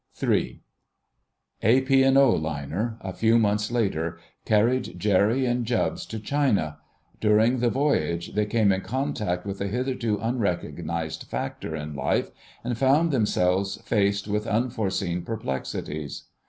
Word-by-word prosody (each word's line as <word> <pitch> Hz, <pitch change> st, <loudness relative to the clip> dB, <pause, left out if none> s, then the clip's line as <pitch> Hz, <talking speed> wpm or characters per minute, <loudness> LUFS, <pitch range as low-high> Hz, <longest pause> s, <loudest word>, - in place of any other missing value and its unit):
*III.* -, -, 0 dB, 1.0 s
A 120 Hz, +5 st, +4 dB
P. 135 Hz, 0 st, +4 dB
& 135 Hz, 0 st, +5 dB
O. 135 Hz, -3 st, +6 dB
liner, 80 Hz, -, -2 dB
a 95 Hz, -1 st, -5 dB
few 115 Hz, +4 st, +3 dB
months 105 Hz, -1 st, +1 dB
later, 85 Hz, -9 st, -1 dB, 0.3 s
carried 110 Hz, -3 st, +2 dB
Jerry 105 Hz, +6 st, +3 dB
and 120 Hz, 0 st, 0 dB
Jubbs 120 Hz, 0 st, -1 dB
to 110 Hz, -, -5 dB
China. 105 Hz, -, 0 dB, 0.4 s
During 110 Hz, +4 st, +3 dB
the 120 Hz, 0 st, +2 dB
voyage 85 Hz, -, 0 dB
they 105 Hz, 0 st, +1 dB
came 105 Hz, -2 st, +3 dB
in 95 Hz, 0 st, 0 dB
contact 110 Hz, -8 st, -2 dB
with 100 Hz, -1 st, -5 dB
a 100 Hz, -, 0 dB
hitherto 125 Hz, -1 st, -1 dB
unrecognised 85 Hz, -, -2 dB
factor 80 Hz, -, -4 dB
in 75 Hz, 0 st, -5 dB
life, 70 Hz, -, 0 dB, 0.3 s
and 120 Hz, 0 st, -2 dB
found 140 Hz, +7 st, +3 dB
themselves 100 Hz, -5 st, +1 dB
faced 100 Hz, -2 st, +1 dB
with 105 Hz, +2 st, -1 dB
unforeseen 105 Hz, -6 st, -1 dB
perplexities. 75 Hz, -6 st, -4 dB
105 Hz, 135 wpm, -25 LUFS, 90-120 Hz, 1.0 s, O